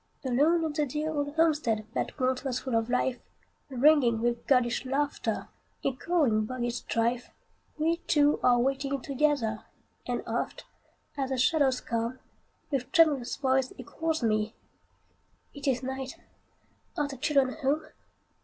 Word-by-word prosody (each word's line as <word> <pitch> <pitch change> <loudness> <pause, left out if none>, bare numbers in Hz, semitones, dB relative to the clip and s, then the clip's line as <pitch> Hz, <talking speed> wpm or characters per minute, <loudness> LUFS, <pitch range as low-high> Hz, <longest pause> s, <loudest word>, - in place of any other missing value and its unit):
Alone 300 +7 +3
in 315 - -1
the 300 -1 +1
dear 300 +4 -2
old 290 0 -2
homestead 300 -10 +2
That - - -3
once 255 0 +1
was 255 -2 -2
full 260 - -4
of 225 +1 +1
life, 250 0 0 0.5
Ringing 260 -3 +4
with 235 0 -1
girlish 250 -3 +2
laughter, 280 +2 -2 0.4
Echoing 270 -5 +1
boyish 240 0 -3
strife, 235 +1 -1 0.5
We 325 +2 +1
two 295 -1 +4
are 245 -1 +5
waiting 275 +2 0
together; 270 -5 0 0.4
And - - -2
oft, - - -3 0.5
as 265 -1 -1
the 265 - -1
shadows 265 -1 +3
come, 235 +2 -2 0.5
With 265 -3 -2
tremulous 310 -8 +4
voice 265 -2 +1
he 255 - -7
calls 320 +2 -2
me, 215 -1 +1 1.0
"It 285 -1 -7
is 255 -1 +1
night! 265 0 -5 0.8
are 295 - +1
the 280 - -7
children 265 -1 +2
home?" 290 +3 +1
265 Hz, 140 wpm, -29 LUFS, 245-295 Hz, 1.0 s, are